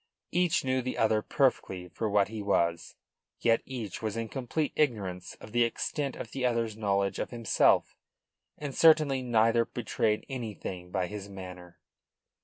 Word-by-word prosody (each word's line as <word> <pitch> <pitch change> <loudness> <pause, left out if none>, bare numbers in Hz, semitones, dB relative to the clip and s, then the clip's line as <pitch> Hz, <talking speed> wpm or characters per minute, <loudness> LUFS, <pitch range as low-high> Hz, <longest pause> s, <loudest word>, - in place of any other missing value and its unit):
Each 175 -4 +2
knew 130 0 +1
the 125 +1 -4
other 110 -1 +3
perfectly 95 -9 0
for 105 +5 -3
what 100 -1 +3
he 110 -1 -5
was; 85 -4 0 0.4
yet 115 -1 +3
each 120 -7 -5
was 110 -1 -2
in 115 -1 -3
complete 140 +4 -2
ignorance 100 -11 -1
of 105 - -13
the 120 +1 +4
extent 135 +4 -2
of 115 - -7
the 135 - -4
other's 115 -3 +1
knowledge 100 -2 0
of - - -2
himself; 115 -3 +2 0.6
and 145 -2 -5
certainly 155 -4 +5
neither 115 -1 +3
betrayed 110 -2 -1
anything 105 -8 -6
by 90 0 0
his 100 +1 -7
manner. 90 -2 -9
110 Hz, 155 wpm, -29 LUFS, 100-130 Hz, 0.6 s, certainly